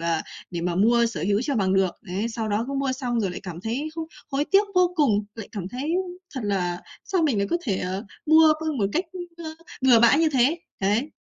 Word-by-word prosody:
mà 165 Hz, -1 st, 0 dB, 0.3 s
để 170 Hz, -1 st, -3 dB
mà 175 Hz, 0 st, -1 dB
mua 235 Hz, +4 st, +4 dB
sở 230 Hz, -, -4 dB
hữu 205 Hz, +3 st, +2 dB
cho 280 Hz, -1 st, -1 dB
bằng 190 Hz, -2 st, +2 dB
được. 190 Hz, -2 st, +3 dB
Đấy, 195 Hz, +3 st, -3 dB
sau 225 Hz, -1 st, -3 dB
đó 210 Hz, +3 st, 0 dB
cứ -, -, -3 dB
mua 275 Hz, -1 st, 0 dB
xong 245 Hz, -3 st, -1 dB
rồi 195 Hz, -3 st, 0 dB
lại -, -, -6 dB
cảm 175 Hz, -2 st, -7 dB
thấy 245 Hz, +9 st, -2 dB
không 325 Hz, -1 st, -3 dB, 0.3 s
hối 280 Hz, +2 st, 0 dB
tiếc 395 Hz, +4 st, +4 dB
vô 360 Hz, -1 st, +4 dB
cùng, 215 Hz, -9 st, +3 dB
lại 220 Hz, -3 st, -8 dB
cảm 190 Hz, -3 st, -5 dB
thấy 270 Hz, +8 st, -3 dB, 0.4 s
thật 260 Hz, -, -3 dB
là 180 Hz, -3 st, -1 dB, 0.2 s
sao 370 Hz, -4 st, 0 dB
mình 275 Hz, -9 st, +2 dB
lại 200 Hz, -, +1 dB
có -, -, +3 dB
thể, 200 Hz, -6 st, 0 dB
ờ, 185 Hz, +3 st, -3 dB, 0.2 s
mua 315 Hz, 0 st, +7 dB
luôn 310 Hz, -4 st, -2 dB
một 200 Hz, -, +2 dB
cách, 345 Hz, -, +1 dB
ưm, 345 Hz, -2 st, -8 dB
ơ, 315 Hz, -, -6 dB, 0.3 s
bừa 245 Hz, -4 st, +6 dB
bãi 235 Hz, +5 st, +6 dB
như 325 Hz, -1 st, +4 dB
thế. 275 Hz, +5 st, +3 dB, 0.2 s
Đấy. 215 Hz, +10 st, +1 dB
235 Hz, 245 wpm, -24 LUFS, 200-305 Hz, 0.4 s, mua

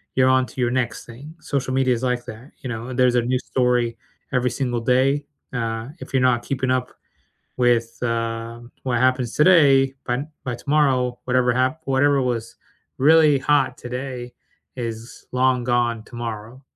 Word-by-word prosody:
you're 130 Hz, 0 st, +4 dB
on 130 Hz, 0 st, +3 dB
to 130 Hz, -, -6 dB
your 120 Hz, -, +1 dB
next 120 Hz, -2 st, -2 dB
thing. 140 Hz, +7 st, -11 dB
Social 135 Hz, -3 st, -2 dB
media 130 Hz, -1 st, +2 dB
is 120 Hz, -, -4 dB
like 125 Hz, -1 st, -1 dB
that, 120 Hz, +7 st, -10 dB
you 130 Hz, -, -6 dB
know, 120 Hz, +2 st, -5 dB
there's 125 Hz, -1 st, +3 dB
a 120 Hz, -, +4 dB
new 125 Hz, +2 st, 0 dB
story 125 Hz, -2 st, 0 dB, 0.3 s
every 125 Hz, -1 st, +1 dB
single 125 Hz, -3 st, -2 dB
day, 135 Hz, +4 st, +2 dB, 0.3 s
uh, 115 Hz, -1 st, -3 dB
if -, -, -10 dB
you're 130 Hz, -, +3 dB
not 125 Hz, -2 st, +3 dB
keeping 130 Hz, -1 st, -1 dB
up 130 Hz, -1 st, -1 dB, 0.7 s
with, 120 Hz, -2 st, +1 dB
uh, 115 Hz, 0 st, -2 dB, 0.2 s
what 125 Hz, -3 st, 0 dB
happens 130 Hz, -1 st, +1 dB
today, 140 Hz, -5 st, +5 dB
by 125 Hz, +3 st, -1 dB, 0.2 s
by 125 Hz, -2 st, -2 dB
tomorrow, 130 Hz, -2 st, +1 dB
whatever 125 Hz, -1 st, +2 dB
hap 130 Hz, +5 st, 0 dB
whatever 140 Hz, +1 st, +3 dB
was 115 Hz, -2 st, -3 dB, 0.4 s
really 150 Hz, 0 st, +5 dB
hot 135 Hz, -2 st, +1 dB
today 125 Hz, 0 st, -6 dB, 0.4 s
is 115 Hz, -1 st, -7 dB
long 125 Hz, -1 st, +2 dB
gone 120 Hz, -2 st, 0 dB
tomorrow. 120 Hz, +1 st, -7 dB
125 Hz, 160 wpm, -22 LUFS, 120-130 Hz, 0.7 s, today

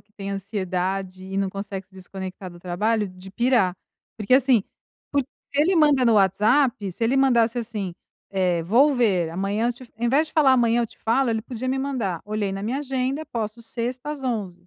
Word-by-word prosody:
que 210 Hz, -, -33 dB
tem 200 Hz, -1 st, -6 dB
ansiedade 190 Hz, -1 st, -3 dB
e 190 Hz, +1 st, -5 dB
não 195 Hz, -1 st, 0 dB
consegue 195 Hz, -1 st, -6 dB
se 195 Hz, -, -42 dB
desconectar 190 Hz, 0 st, -7 dB
do 175 Hz, 0 st, -14 dB
trabalho, 210 Hz, +4 st, 0 dB
de 185 Hz, +1 st, -12 dB
pirar. 235 Hz, -6 st, +2 dB, 0.4 s
Porque 215 Hz, +2 st, -2 dB
assim, 260 Hz, -5 st, +4 dB, 0.5 s
por 280 Hz, -1 st, +2 dB, 0.3 s
se 285 Hz, -, +1 dB
ele 360 Hz, +5 st, +3 dB
manda 295 Hz, -5 st, +4 dB
no 230 Hz, -, +5 dB
WhatsApp, 210 Hz, +2 st, +3 dB
se 230 Hz, -, -9 dB
ele 240 Hz, +4 st, +2 dB
mandasse 245 Hz, -3 st, +3 dB
assim: 210 Hz, -6 st, -4 dB, 0.4 s
"Eh, 180 Hz, -3 st, +1 dB
vou 255 Hz, -, +4 dB
ver, 190 Hz, -10 st, +2 dB
amanhã 200 Hz, +6 st, -1 dB
eu -, -, 0 dB
te" 245 Hz, 0 st, -15 dB
ao 240 Hz, -, -2 dB
invés 290 Hz, +6 st, +3 dB
de -, -, -16 dB
falar 290 Hz, -4 st, +5 dB
"amanhã 240 Hz, -2 st, +3 dB
eu 235 Hz, -, -1 dB
te -, -, -20 dB
falo", 235 Hz, +2 st, +1 dB
ele 220 Hz, -1 st, -1 dB
podia 245 Hz, +1 st, -6 dB
me 265 Hz, +1 st, 0 dB
mandar: 230 Hz, -11 st, -2 dB
"Olhei 210 Hz, -2 st, -2 dB
na 195 Hz, +1 st, -4 dB
minha 245 Hz, +6 st, -1 dB
agenda, 270 Hz, +2 st, -2 dB
posso 225 Hz, 0 st, -4 dB
sexta 245 Hz, +4 st, -4 dB
às 280 Hz, -3 st, -8 dB
11h". 195 Hz, -8 st, -3 dB
220 Hz, 205 wpm, -24 LUFS, 195-255 Hz, 0.5 s, no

